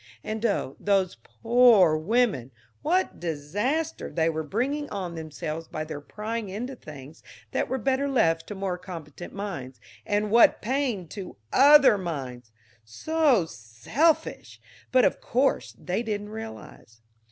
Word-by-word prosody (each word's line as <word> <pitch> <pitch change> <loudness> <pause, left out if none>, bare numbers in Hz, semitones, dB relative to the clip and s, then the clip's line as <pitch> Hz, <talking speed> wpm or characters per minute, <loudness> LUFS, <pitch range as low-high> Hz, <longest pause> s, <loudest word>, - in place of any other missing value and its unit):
And 220 +1 -4
oh, 140 -9 -2
those 195 -3 +1 0.3
poor 230 -8 +6
women, 185 - +1 0.3
what 360 +5 0
disaster 205 - -2
they 165 -1 +1
were 160 -1 -2
bringing 265 - -2
on 185 -4 -4
themselves 160 0 -6
by 155 -2 -4
their 155 -2 -7
prying 215 +5 -5
into 245 +7 -5
things 150 - -12 0.3
that - - 0
were 260 - 0
better 265 +4 0
left 165 -11 +2
to 210 - -6
more 190 -2 -3
competent 170 -2 -9
minds, 170 -11 -6 0.2
and 205 0 -1
what 230 +1 +6
pain 245 -7 -1
to 190 - -8 0.2
other 275 -5 +7
minds! 130 -10 -6 0.3
So 260 - +1
selfish, 115 - -1 0.3
but 255 -1 +5
of - - 0
course 265 +3 0
they 185 +5 -2
didn't 210 -3 -4
realize. 220 - -10
200 Hz, 135 wpm, -26 LUFS, 160-245 Hz, 0.3 s, other